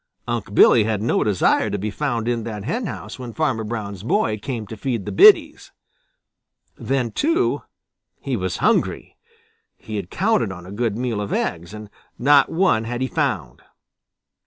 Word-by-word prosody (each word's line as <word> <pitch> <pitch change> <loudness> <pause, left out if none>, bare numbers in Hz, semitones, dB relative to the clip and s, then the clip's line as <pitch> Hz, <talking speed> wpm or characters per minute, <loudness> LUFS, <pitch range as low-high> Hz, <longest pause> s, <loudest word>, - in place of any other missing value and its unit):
Unc' 115 -4 -4
Billy 115 - +6
had 110 -1 -1
no 110 +3 +1
desire 105 -4 +2
to 105 - -2
be 105 +2 -3
found 120 -4 -2
in 120 -2 -1
that 105 -3 -6
henhouse 220 - -5
when 120 -2 -7
Farmer 135 -8 -1
Brown's 105 -4 -5
boy 110 0 0
came 115 0 -5
to 110 - -8
feed 115 -2 -3
the - - -4
biddies. 415 +2 +5 1.0
Then, 130 -4 -2
too, 330 - +1 0.6
he - - -3
was - - -3
hungry. - - 0 0.6
He 110 -1 -7
had 95 -3 -5
counted 180 - +1
on 90 -1 -9
a 95 - -10
good 110 0 -2
meal 120 -4 -2
of 100 - -5
eggs, 85 +1 -2
and 105 0 -9 0.3
not 140 +2 +4
one 160 -11 +2
had 120 +2 -4
he 130 - 0
found. - - -2
115 Hz, 165 wpm, -21 LUFS, 105-130 Hz, 1.0 s, Billy